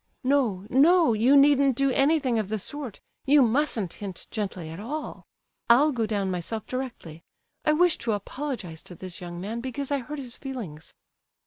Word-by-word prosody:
"No, 250 Hz, -8 st, +1 dB
no, 315 Hz, +2 st, +5 dB
you 240 Hz, +6 st, +5 dB
needn't 280 Hz, -2 st, +5 dB
do 275 Hz, +1 st, +2 dB
anything 275 Hz, -3 st, +2 dB
of 205 Hz, -3 st, -3 dB
the 220 Hz, -, -1 dB
sort; 260 Hz, +1 st, -6 dB, 0.3 s
you 285 Hz, 0 st, +6 dB
mustn't 230 Hz, -, 0 dB
hint 195 Hz, -4 st, -7 dB
gently 190 Hz, -6 st, -4 dB
at 165 Hz, +3 st, -8 dB
all. 290 Hz, +9 st, -6 dB, 0.4 s
I'll 280 Hz, +6 st, +6 dB
go 230 Hz, -5 st, -1 dB
down 200 Hz, -3 st, -1 dB
myself 185 Hz, +5 st, -4 dB
directly. 240 Hz, -11 st, -6 dB, 0.4 s
I 305 Hz, -, +4 dB
wish 350 Hz, +1 st, +3 dB
to 230 Hz, -2 st, -1 dB
apologize 205 Hz, -, -5 dB
to 180 Hz, -, -9 dB
this 185 Hz, 0 st, -8 dB
young 175 Hz, -1 st, -7 dB
man, 220 Hz, +6 st, -4 dB
because 265 Hz, +2 st, -4 dB
I 285 Hz, -, +2 dB
hurt 295 Hz, +4 st, -7 dB
his 250 Hz, -4 st, -7 dB
feelings." 215 Hz, -, -7 dB
240 Hz, 175 wpm, -26 LUFS, 200-280 Hz, 0.4 s, you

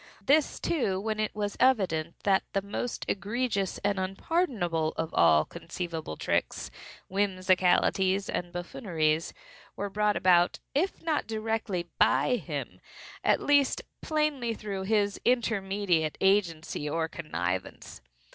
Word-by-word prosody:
This, 295 Hz, +1 st, +3 dB
too, 220 Hz, -, 0 dB
when 215 Hz, +1 st, -2 dB
it 215 Hz, -1 st, -1 dB
was 205 Hz, -1 st, -2 dB
evident 185 Hz, -11 st, +2 dB
that 195 Hz, -1 st, +3 dB
the 195 Hz, -, 0 dB
most 215 Hz, +4 st, -4 dB
egregious 205 Hz, 0 st, -1 dB
and 200 Hz, -1 st, +1 dB
unpardonable 190 Hz, -, -1 dB
of 160 Hz, 0 st, -3 dB
all 80 Hz, -2 st, +5 dB
conceivable 165 Hz, -, -6 dB
tricks, -, -, -1 dB, 0.4 s
whimsicalities 190 Hz, 0 st, +2 dB
and 175 Hz, 0 st, -3 dB
buffooneries 170 Hz, -3 st, -1 dB, 0.4 s
were 200 Hz, 0 st, -4 dB
brought 210 Hz, 0 st, +1 dB
about, 175 Hz, -1 st, +4 dB, 0.2 s
if 335 Hz, +6 st, -1 dB
not 315 Hz, -3 st, 0 dB
directly 220 Hz, -5 st, -2 dB
by 135 Hz, -, +4 dB
him, -, -, -6 dB, 0.4 s
at -, -, +3 dB
least 285 Hz, -2 st, +3 dB, 0.2 s
plainly 295 Hz, -7 st, 0 dB
through 195 Hz, -3 st, -5 dB
his 205 Hz, -1 st, +1 dB
intermediate 195 Hz, -9 st, +1 dB
agency 170 Hz, -6 st, +1 dB
or 160 Hz, +2 st, 0 dB
connivance. 95 Hz, -, -4 dB
195 Hz, 120 wpm, -28 LUFS, 170-220 Hz, 0.4 s, all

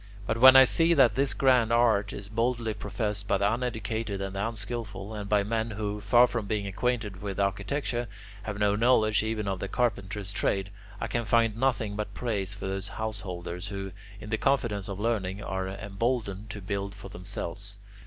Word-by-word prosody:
But 115 Hz, +2 st, -1 dB
when 130 Hz, +2 st, +10 dB
I 135 Hz, -, +11 dB
see 165 Hz, +6 st, +4 dB
that 130 Hz, -6 st, +6 dB
this 135 Hz, +4 st, +1 dB
grand 125 Hz, -4 st, +4 dB
art 115 Hz, -4 st, +3 dB
is 100 Hz, -1 st, -7 dB
boldly 115 Hz, +1 st, 0 dB
professed 105 Hz, 0 st, -3 dB
by 100 Hz, -, +3 dB
the 100 Hz, +2 st, +2 dB
uneducated 110 Hz, -3 st, -2 dB
and 95 Hz, 0 st, -4 dB
the 100 Hz, +3 st, 0 dB
unskilful, 110 Hz, -2 st, -5 dB
and 105 Hz, -2 st, -5 dB
by 105 Hz, -1 st, +3 dB
men 110 Hz, +2 st, -1 dB
who, 105 Hz, -1 st, -3 dB
far 120 Hz, +4 st, +6 dB
from 115 Hz, -4 st, -3 dB
being 105 Hz, -1 st, -1 dB
acquainted 105 Hz, -1 st, -2 dB
with 100 Hz, -1 st, -4 dB
architecture, 115 Hz, +5 st, -1 dB, 0.3 s
have 105 Hz, 0 st, -5 dB
no 105 Hz, -1 st, +2 dB
knowledge 110 Hz, -2 st, +4 dB
even 110 Hz, -1 st, -2 dB
of 95 Hz, -1 st, -2 dB
the 100 Hz, -, -3 dB
carpenter's 100 Hz, -3 st, -1 dB
trade, 95 Hz, -1 st, 0 dB, 0.3 s
I -, -, -2 dB
can 120 Hz, -, -1 dB
find 115 Hz, 0 st, +3 dB
nothing 115 Hz, -4 st, 0 dB
but 105 Hz, 0 st, -4 dB
praise 100 Hz, -5 st, -2 dB
for 100 Hz, -, -7 dB
those 95 Hz, +1 st, -3 dB
householders 95 Hz, -5 st, -5 dB
who, 95 Hz, -1 st, -5 dB, 0.3 s
in 105 Hz, +1 st, -9 dB
the 110 Hz, -, 0 dB
confidence 120 Hz, -8 st, +1 dB
of 100 Hz, 0 st, -5 dB
learning, 105 Hz, -3 st, -1 dB
are 95 Hz, 0 st, -3 dB
emboldened 105 Hz, +1 st, -2 dB
to 105 Hz, 0 st, -7 dB
build 100 Hz, +1 st, -3 dB
for 100 Hz, -1 st, -10 dB
themselves. 100 Hz, 0 st, -3 dB
105 Hz, 185 wpm, -28 LUFS, 100-115 Hz, 0.3 s, I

